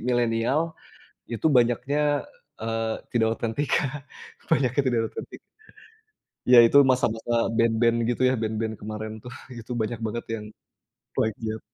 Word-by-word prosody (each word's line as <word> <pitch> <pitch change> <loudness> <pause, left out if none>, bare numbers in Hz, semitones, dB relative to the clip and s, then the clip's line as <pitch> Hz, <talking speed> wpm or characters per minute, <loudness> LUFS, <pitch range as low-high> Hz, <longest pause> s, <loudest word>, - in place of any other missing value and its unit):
millenial 120 +6 +1 0.6
itu 115 +5 -1
banyaknya, 140 +4 +2 0.4
eee, 115 0 -2 0.2
tidak 115 -2 +3
otentik 115 +5 -2
Kak, 145 0 -1 0.4
banyaknya 130 +1 +3
tidak 120 -3 +2
otentik. - - -8 1.1
Iya, 125 0 +7
itu 115 - +5
masa-masa 120 -2 -1 0.3
band-band 115 0 +3
gitu 120 - -1
ya, - - +2
band-band 110 0 -2
kemarin 110 +1 -5
tuh 125 - -9 0.3
itu 115 +2 -10
banyak 110 +1 -3
banget 115 +2 -3
yang 105 -1 -7 0.7
flight 110 -1 0
jet. 110 0 -3
115 Hz, 130 wpm, -25 LUFS, 110-125 Hz, 1.1 s, Iya